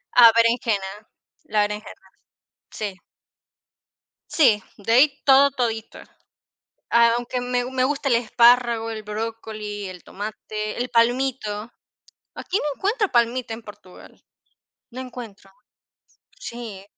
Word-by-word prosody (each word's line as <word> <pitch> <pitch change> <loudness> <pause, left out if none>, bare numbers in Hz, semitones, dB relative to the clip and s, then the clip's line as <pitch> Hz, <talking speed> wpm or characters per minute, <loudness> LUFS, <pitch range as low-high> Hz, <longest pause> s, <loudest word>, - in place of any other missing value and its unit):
Ah, 235 -2 +9
berenjena. 220 -4 +1 0.4
La 210 0 +2
berenjena, 210 +1 -9 0.6
sí 205 -3 -5 1.3
sí, 215 - +3
de 220 +3 -1
ahí 275 +3 +4
todo, 275 +1 +6
todito. 225 -3 -3 0.9
Aunque 235 +1 +2
me 245 0 -1
me 255 0 -1
gusta 280 +1 -1
el 240 - +4
espárrago, 235 0 +3
el 220 -1 -6
brócoli, 210 -1 -5
el 180 -2 -11
tomate, 215 +1 -6
el 245 +1 -2
palmito. 235 -2 0 0.6
Aquí 380 - -2
no - - -4
encuentro 410 - 0
palmito 240 0 +1
en 225 - -8
Portugal. 195 -4 -15 0.7
No 255 +2 -6
encuentro. 230 -6 -10 0.9
Sí 230 - -8
230 Hz, 110 wpm, -23 LUFS, 215-250 Hz, 1.3 s, Ah